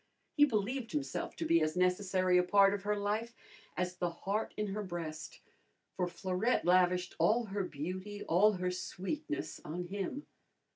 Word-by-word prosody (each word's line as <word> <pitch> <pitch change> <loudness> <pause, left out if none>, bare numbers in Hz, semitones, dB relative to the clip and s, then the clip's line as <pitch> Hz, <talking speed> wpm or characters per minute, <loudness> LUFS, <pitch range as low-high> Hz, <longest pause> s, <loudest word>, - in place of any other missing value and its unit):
He 290 - +7
believed 230 0 -2
himself 295 -2 -3
to 330 - -3
be 335 +1 +4
as 155 +2 0
necessary 180 0 +3
a - - +3
part 195 +2 +5
of 205 - -2
her 210 +1 0
life 215 +3 -2 0.4
as 180 0 -2
the 175 -1 0
heart 195 +5 -2
in 210 - 0
her 210 - -2
breast, 170 -5 -6 0.5
for 180 -2 0
Florette 185 +6 0
lavished 180 0 +3
all 230 +2 +3
her 200 -1 -2
beauty, 185 +6 -5
all 205 +6 +4
her 180 -1 -1
sweetness 295 - -4
on 170 +4 -4
him. 200 +9 -4
195 Hz, 160 wpm, -33 LUFS, 180-215 Hz, 0.5 s, He